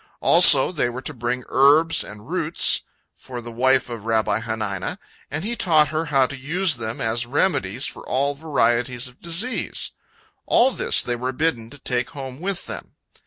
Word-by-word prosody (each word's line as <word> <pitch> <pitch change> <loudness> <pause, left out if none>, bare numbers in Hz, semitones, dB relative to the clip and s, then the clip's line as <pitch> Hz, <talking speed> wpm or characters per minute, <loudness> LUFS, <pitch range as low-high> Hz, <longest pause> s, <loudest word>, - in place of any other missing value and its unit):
Also 160 -5 +6
they 150 -8 0
were 125 +2 -7
to 155 - -4
bring 125 0 -3
herbs 150 +5 +4
and 105 +2 -12
roots 170 -2 +3 0.3
for 125 -2 -9
the 120 0 -9
wife 130 +2 +2
of 115 -4 -8
Rabbi 110 -1 0
Hanina, 110 -4 -4 0.3
and 145 +4 -4
he 235 +2 -2
taught 155 -8 +3
her 155 +1 -2
how 140 -4 +2
to 140 - -6
use 160 +4 -2
them 110 -1 -5
as 115 +1 -1
remedies 130 - -1
for - - -6
all 140 +2 0
varieties 125 -4 0
of 125 0 -13
disease. 175 +10 0 0.6
All 255 +3 +4
this - - +3
they 120 - -2
were 125 +2 -3
bidden 125 -5 -2
to 145 - -11
take 125 -1 -2
home 130 -1 -7
with 195 0 -3
them. - - -9
130 Hz, 175 wpm, -22 LUFS, 120-155 Hz, 0.6 s, Also